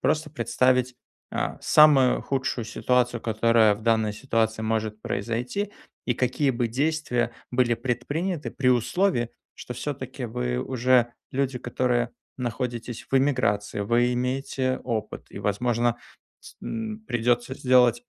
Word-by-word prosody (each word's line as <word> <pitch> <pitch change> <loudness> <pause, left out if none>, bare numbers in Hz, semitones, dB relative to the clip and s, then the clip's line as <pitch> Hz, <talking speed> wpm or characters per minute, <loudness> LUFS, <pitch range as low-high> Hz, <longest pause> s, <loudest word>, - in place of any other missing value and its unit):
Просто 155 -1 0
представить, 125 -1 +1 0.3
а, - - -2
самую 145 -4 +5
худшую 130 -3 -2
ситуацию, 125 +1 +1
которая 110 -1 +3
в 110 - -13
данной 110 -2 +2
ситуации 110 -2 -1
может 110 -1 -1
произойти. 125 - -2 0.4
И 125 - +1
какие 130 +3 +1
бы 120 -1 0
действия 125 -2 0 0.2
были 125 -1 +3
предприняты 145 +8 -2
при 130 -2 0
условии, 125 - +2 0.3
что - - -7
всё-таки - - -5
вы 60 0 -2
уже 125 - +2 0.2
люди, 135 -1 -1
которые 120 -1 0 0.3
находитесь 120 -1 -4
в 135 - +2
эмиграции, 115 -7 +1
вы 120 +4 +2
имеете 130 +1 -1
опыт, 110 -2 -4
и, - - -8
возможно, 115 +4 0 0.4
с - - -14
н 220 -1 -4
придётся 120 +2 0
сделать 125 -3 +4
120 Hz, 125 wpm, -25 LUFS, 115-130 Hz, 0.4 s, самую